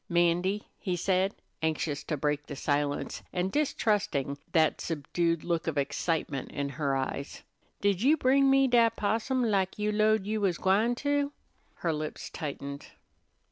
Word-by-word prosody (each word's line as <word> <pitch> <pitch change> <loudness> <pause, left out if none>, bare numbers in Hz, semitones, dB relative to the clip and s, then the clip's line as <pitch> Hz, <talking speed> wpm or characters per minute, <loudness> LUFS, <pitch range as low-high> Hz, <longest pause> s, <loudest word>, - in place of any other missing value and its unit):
"'Mandy," 175 +4 +2
he 185 -2 -1
said, 185 +2 +1 0.3
anxious 155 -2 -1
to 155 - -2
break 150 +1 -1
the 145 - -6
silence, 145 0 -1
and 180 +1 -1
distrusting 205 - 0
that 160 -2 +3
subdued 165 +1 -1
look 170 -1 -1
of 155 -2 -1
excitement 140 0 -1
in 140 -1 -2
her 140 -1 -1
eyes, 135 +1 -4 0.4
"did 200 -2 +2
you 290 +6 +5
bring 275 0 +4
me 270 0 +5
dat 230 -2 +4
possum, 230 +5 0
lak 195 -4 +1
you 210 0 0
'lowed 215 -1 +3
you 215 +1 -1
was 185 -4 +1
gwine 215 +6 +2
to?" 285 +2 0 0.4
Her 165 -2 -1
lips 155 0 -5
tightened. 140 -2 -6
180 Hz, 150 wpm, -29 LUFS, 150-215 Hz, 0.4 s, you